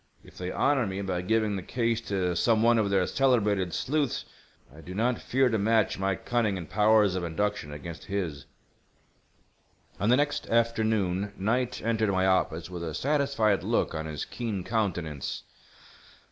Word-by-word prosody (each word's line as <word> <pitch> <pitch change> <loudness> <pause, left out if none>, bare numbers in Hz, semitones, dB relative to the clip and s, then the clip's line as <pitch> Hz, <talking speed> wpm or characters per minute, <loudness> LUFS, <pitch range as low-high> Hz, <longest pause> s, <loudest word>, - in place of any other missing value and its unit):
If - - -17
they 90 0 -5
honor 135 -5 +2
me 95 0 -4
by 90 -2 -2
giving 110 +2 +1
the 95 - -3
case 115 +3 -1
to 90 -3 0
some 110 +4 +3
one 120 0 +5
of 105 -2 +1
their 95 -2 +2
celebrated 105 -9 +2
sleuths 145 - -1 0.5
I 80 - -12
do 90 +4 -9
not 120 +3 0
fear 130 +1 +2
to 110 -3 0
match 110 -1 +2
my 95 0 +1
cunning 110 -2 0
and 85 -3 -7
powers 105 0 +4
of 90 -1 -2
induction 85 -2 -2
against 80 +2 -8
his." 90 -9 -4 1.5
On 105 - +1
the 125 - +5
next 145 0 -1
afternoon 110 -4 +1
Knight 120 +5 -1
entered 110 -1 +1
my 95 -1 +2
office 90 -3 +1
with 90 -2 -6
a 80 -3 -4
satisfied 135 - +1
look - - 0
on 80 0 -4
his 75 -1 -4
keen 110 -6 -4
countenance. 85 - -2
105 Hz, 165 wpm, -28 LUFS, 90-115 Hz, 1.5 s, one